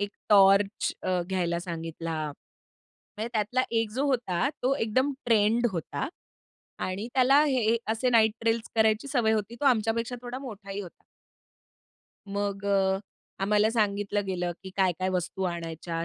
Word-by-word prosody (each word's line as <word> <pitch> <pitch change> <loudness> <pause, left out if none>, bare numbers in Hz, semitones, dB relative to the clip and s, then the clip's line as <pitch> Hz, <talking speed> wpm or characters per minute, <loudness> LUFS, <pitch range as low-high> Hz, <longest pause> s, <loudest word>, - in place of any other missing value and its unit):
एक 205 0 -2 0.2
टॉर्च 195 0 +5
अ, 185 -1 0
घ्यायला 175 -3 0
सांगितला. 165 -2 -5 1.0
म्हणजे 220 +2 -3
त्यातला 220 +3 +1
1 225 -2 0
जो 260 +6 -1
होता, 245 -4 +1
तो 260 +2 +2
एकदम 260 +3 +1
ट्रेंड 225 +1 +3
होता 170 - -3 0.8
आणि 190 +4 -3
त्याला 270 +3 +5
हे 245 -6 +2 0.2
असे 250 +3 0
नाइट 220 -2 +5
ट्रेलस 230 0 0
करायची 220 +3 +2
सवय 240 -5 +2
होती, 220 +1 -1
तो - - -2
आमच्यापेक्षा 230 0 +1
थोडा 245 +1 -5
मोठाही 205 -6 -7
होता. 180 -4 -11 1.3
मग 200 0 -3
अ, 190 -1 +2 0.4
आम्हाला 210 +2 +3
सांगितलं 205 -2 0
गेलं, 180 -2 -2
की 190 - -8
काय-काय 185 -1 +1
वस्तू 185 +1 -2
आणायच्या. 165 -1 -4
210 Hz, 140 wpm, -27 LUFS, 190-230 Hz, 1.3 s, टॉर्च